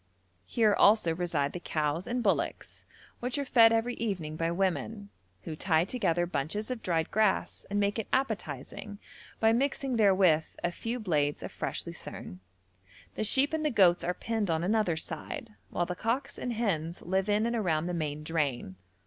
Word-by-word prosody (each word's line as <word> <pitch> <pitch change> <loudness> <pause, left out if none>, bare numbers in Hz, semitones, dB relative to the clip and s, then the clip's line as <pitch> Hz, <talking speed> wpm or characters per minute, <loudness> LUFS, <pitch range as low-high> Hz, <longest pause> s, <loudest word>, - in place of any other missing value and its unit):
Here 220 -3 +3
also 200 -5 +5
reside 160 -5 -1
the 180 - -4
cows 155 +1 -1
and 245 0 -1
bullocks, 200 - -1 0.3
which 250 +3 -2
are 285 - -1
fed 230 -3 +6
every 230 +2 +1
evening 180 -11 -3
by 165 +1 0
women, 195 +3 -2 0.3
who 155 - -5
tie 160 0 +2
together 180 -7 0
bunches 175 - -3
of 245 -3 -4
dried 165 -3 0
grass 215 -1 +1
and 205 +1 0
make 205 +2 +1
it 220 - -3
appetising 205 - -3 0.4
by 225 0 +4
mixing 265 0 0
therewith 190 -7 +4 0.2
a 175 - +1
few 230 +7 -4
blades 150 -8 0
of - - -6
fresh - - -3
lucerne; 90 - -8 0.7
the - - -2
sheep 265 +7 +3
and 315 -1 0
the 305 - +2
goats 185 -8 +4
are 180 +1 -1
penned 220 -2 -2
on 165 0 +1
another 195 -4 +1
side, 225 - -5 0.2
whilst 175 0 -1
the 180 - -2
cocks 260 +8 -2
and 245 - -2
hens 175 -8 -2
live 190 +3 0
in 210 +2 +2
and 235 0 0
around 170 -8 0
the 180 - -2
main 150 -3 -3
drain. 140 - -2
195 Hz, 175 wpm, -30 LUFS, 165-225 Hz, 0.7 s, fed